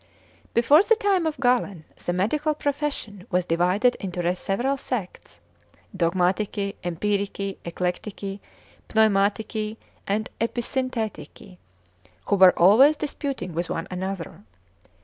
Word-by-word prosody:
Before 280 +8 +6
the 455 +3 +4
time 395 -7 +1
of 305 -4 -3
Galen 240 - +1 0.2
the - - -1
medical 295 - 0
profession 280 -9 -3
was 180 -2 +1
divided 180 +8 +2
into 180 -2 -2
several 240 +9 -1
sects, 245 -8 -6 0.3
e.g. - - -31 0.2
Dogmatici, 190 +3 0
Empirici, 200 +2 -2
Eclectici, 195 +3 -4 0.5
Pneumatici, 215 +1 +1 0.3
and 210 +2 0
Episynthetici, 230 -5 -3 0.7
who 205 - +2
were 185 -2 +7
always 255 - +6
disputing 275 - -4
with 170 +1 -3
one 165 - -3
another. 185 - -5
205 Hz, 110 wpm, -24 LUFS, 180-250 Hz, 0.7 s, were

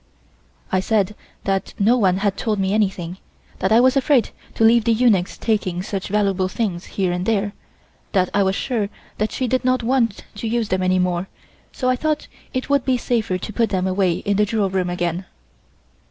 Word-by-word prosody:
I 185 - +3
said 205 0 +1 0.3
that 195 -1 -1
no 220 +5 +4
one 190 -6 +3
had 200 0 0
told 215 +1 -1
me 195 0 0
anything, 190 -4 -1 0.4
that 190 - 0
I 225 - +7
was 255 +2 +4
afraid 275 -2 +3 0.2
to - - +1
have 230 +1 +6
the 230 0 +3
eunuchs 215 -6 +2
taking 185 -5 -1
such 195 -1 -4
valuable 195 -2 +1
things 185 -4 -3
here 190 -3 +1
and 180 0 -2
there, 205 -2 +1 0.6
that 185 -3 +2
I 205 - +3
was 190 0 +2
sure 220 -5 -1 0.3
that 215 +1 0
she 255 - -1
did 255 +2 0
not 255 -1 +1
want 230 -3 +1
to 225 - -3
use 230 -1 0
them 185 0 0
any 185 0 +2
more, 180 0 0 0.4
so 255 - -3
I 255 - +3
thought 305 +2 -1 0.3
it 255 -1 -3
would 280 -2 +2
be 260 -2 +2
safer 225 -6 0
to 215 - -7
put 230 +1 +1
them 185 -2 0
away 185 -1 +2
in 200 +3 -1
the 210 - +4
jewel 210 -3 0
room 185 -2 0
again. 175 +1 -2
205 Hz, 200 wpm, -21 LUFS, 185-230 Hz, 0.6 s, I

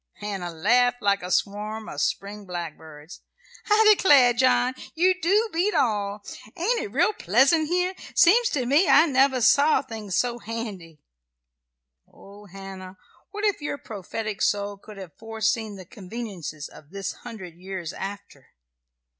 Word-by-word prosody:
Hannah 195 -4 -5
laughed 245 +8 +2
like 200 0 +2
a 180 - -6
swarm 210 +3 -2
of - - -5
spring 200 0 -3
blackbirds. 160 -3 -8 0.5
"I 430 +1 +5
declare, 280 -11 +5
John, 255 +1 +2 0.2
you 365 +3 +4
do 405 +6 +2
beat 370 +6 0
all! 205 -3 0 0.3
Ain't 455 +8 0
it 200 - -6
real 350 - +2
pleasant 275 - +3
here? 360 +2 0 0.2
Seems 455 +7 +5
to 260 -4 -1
me 290 +9 +3
I 315 - +7
never 265 -3 +2
saw 285 +6 +4
things 220 -7 -5
so 240 -1 0
handy." 205 -9 -7 1.1
Oh, 205 +1 -15
Hannah, 190 0 -10 0.3
what 415 +1 -4
if 410 -6 0
your 290 0 -3
prophetic 215 -1 -6
soul 205 0 0
could 210 0 -13
have 185 -5 -10
foreseen 220 -1 -2
the 190 -2 -11
conveniences 190 - -7
of 150 - -16
this 195 +1 -5
hundred 210 -8 -9
years 180 -1 -7
after! 200 +1 -8
215 Hz, 145 wpm, -24 LUFS, 195-275 Hz, 1.1 s, I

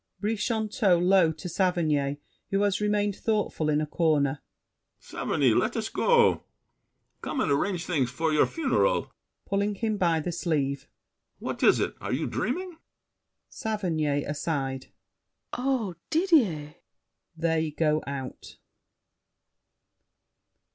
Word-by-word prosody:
BRICHANTEAU 215 -3 +1
(low 180 -2 +4
to 155 +3 -8
Saverny, 155 -6 +1 0.3
who 195 0 +1
has 205 0 +1
remained 205 -1 +1
thoughtful 210 -9 -1
in 150 0 +2
a 155 - 0
corner). 150 -3 +1 0.6
Saverny, - - 0
let - - +1
us - - -2
go! 475 -1 +3 0.8
Come - - -3
and 160 - +1
arrange 175 +5 0
things 140 -8 0
for 160 +5 -1
your 150 - +4
funeral! 330 - 0 0.3
[Pulling 200 +1 0
him 215 0 -1
by 170 -4 +2
the 175 +3 -3
sleeve. 140 -5 -1 0.5
What - - -5
is - - +5
it? - - -1
Are - - -4
you - - 0
dreaming? 360 -3 -3 0.7
SAVERNY 160 -10 -1
(aside). 140 -3 -3 0.7
Oh, 250 -7 -1 0.2
Didier! 255 - +2 0.6
[They 160 -1 +1
go 155 0 +1
out. 135 -2 -7
175 Hz, 115 wpm, -27 LUFS, 150-210 Hz, 0.8 s, is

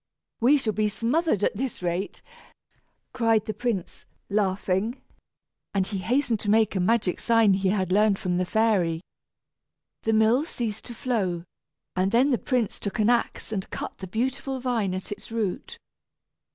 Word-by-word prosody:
"We 260 +6 +5
shall 225 -6 -1
be 215 0 +1
smothered 235 - 0
at - - +1
this 245 -4 -4
rate," 175 +3 -2 0.9
cried 225 -4 +2
the 215 - -3
prince 210 -4 -3 0.3
laughing, 200 +3 0 0.8
and 190 -1 +2
he 195 0 -3
hastened 245 +1 +1
to 205 - -3
make 220 -1 +3
a - - +1
magic 190 0 +1
sign 230 -4 +4
he 190 0 +1
had 185 -2 0
learned 205 0 +4
from 180 -2 -1
the 185 - +1
fairy. 185 -6 +2 1.0
The 225 - +1
mill 220 +5 +4
ceased 230 -9 -4
to 240 - -8
flow, 195 -9 -1 0.5
and 185 +1 +2
then 255 +5 +4
the 245 - +2
prince 245 -6 -1
took 200 - -4
an 215 +2 +4
axe 240 -2 -1
and 195 -3 -3
cut - - -6
the 190 - -6
beautiful 260 +6 -2
vine 230 -7 0
at 185 +1 -6
its 205 +2 -7
root. 215 -5 -3
215 Hz, 165 wpm, -26 LUFS, 190-235 Hz, 1.0 s, We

